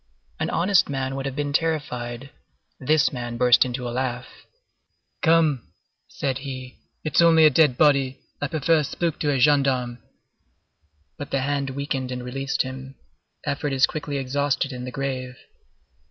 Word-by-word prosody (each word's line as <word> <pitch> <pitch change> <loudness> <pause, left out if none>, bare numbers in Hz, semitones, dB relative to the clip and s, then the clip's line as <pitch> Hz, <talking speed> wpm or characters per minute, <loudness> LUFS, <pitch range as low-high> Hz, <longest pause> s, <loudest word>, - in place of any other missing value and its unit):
An - - -1
honest 185 -1 +3
man 135 -1 -2
would 135 0 -3
have 135 - -5
been 145 -1 -2
terrified; 135 -5 -2 0.5
this 145 +1 +2
man 120 -2 -5
burst 125 0 +5
into 125 0 -4
a - - -4
laugh. 125 0 -2 1.0
"Come," 160 -6 +2 0.3
said 135 -1 -3
he, 130 -2 -8 0.2
"it's 155 +1 +2
only 165 -2 +6
a 155 - +7
dead 145 -3 +4
body. 140 -3 +3 0.2
I 145 - 0
prefer 160 +1 +2
a - - 0
spook 165 +3 -2
to 150 - 0
a 140 - +2
gendarme." 130 -3 +2 1.2
But 145 - -6
the 135 - 0
hand 140 0 -1
weakened 135 -1 -3
and 125 -1 -4
released 135 +2 -1
him. 130 +1 -8 0.5
Effort 145 -1 -2
is 135 -1 +5
quickly 145 -2 -4
exhausted 140 +1 -1
in 125 -1 -6
the 125 - -6
grave. 130 -2 -4
135 Hz, 155 wpm, -24 LUFS, 130-145 Hz, 1.2 s, a